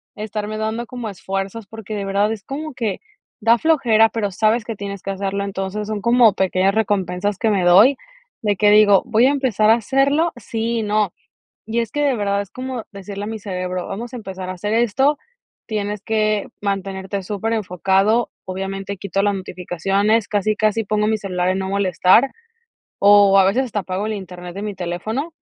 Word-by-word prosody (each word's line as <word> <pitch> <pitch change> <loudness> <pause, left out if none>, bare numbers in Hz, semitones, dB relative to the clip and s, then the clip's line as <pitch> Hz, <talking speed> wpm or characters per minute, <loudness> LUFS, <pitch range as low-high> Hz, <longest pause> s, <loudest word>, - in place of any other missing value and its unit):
estarme 215 0 -4
dando 220 +2 -2
como 245 -3 -6
esfuerzos", 195 +3 -5
porque 220 -1 -7
de 200 - -3
verdad 200 +2 +1
es 210 -3 -9
como 300 +2 -6
que 220 -5 -3 0.4
da 230 +2 +5
flojera, 235 -7 +4
pero 210 -4 -2
sabes 220 +4 +1
que 230 - -4
tienes 200 -1 -6
que 195 - -4
hacerlo, 200 +1 -2
entonces 200 +2 -4
son 215 -1 -3
como 235 -1 +5
pequeñas 190 +1 +1
recompensas 200 -2 0
que 225 -1 +1
me 195 -3 +1
doy, 200 +10 +6 0.5
de 205 -2 +1
que 210 +2 +4
digo: 205 -2 +6
"Voy 230 +2 +3
a 275 - +3
empezar 245 -7 +1
a 225 - +7
hacerlo", 275 +8 +1
sí 230 +1 -2
y - - -1
no, 210 -3 0 0.5
y 230 +2 0
es 230 0 -4
que 295 - -1
de 280 -3 +2
verdad 200 -1 0
es 200 - -13
como 255 -2 -5
decirle 200 +1 -7
a - - -5
mi 220 0 -5
cerebro, 185 -2 -4
vamos 230 +5 -6
a - - -4
empezar 190 -5 -7
a - - -2
hacer 205 +4 -3
esto, 265 +6 +2 0.5
tienes 210 -2 -3
que 215 -1 0
mantenerte 195 0 -3
superenfocado, 205 +1 0 0.2
obviamente, 195 +1 -4
quito 195 0 -2
las 205 0 +2
notificaciones, 195 +4 0
casi, 215 +1 +1
casi 215 +1 +1
pongo 210 +1 0
mi 220 0 +1
celular 180 -2 -2
en 185 - 0
no 190 - -3
molestar, 195 +5 +3 0.7
o 200 -1 +6
a 195 - +6
veces 205 +8 +2
hasta 210 -3 -2
apago 185 +3 -3
el 220 - -2
Internet 180 -2 -8
de 200 - -6
mi 210 -2 -4
teléfono 205 - -4
205 Hz, 190 wpm, -20 LUFS, 195-225 Hz, 0.7 s, a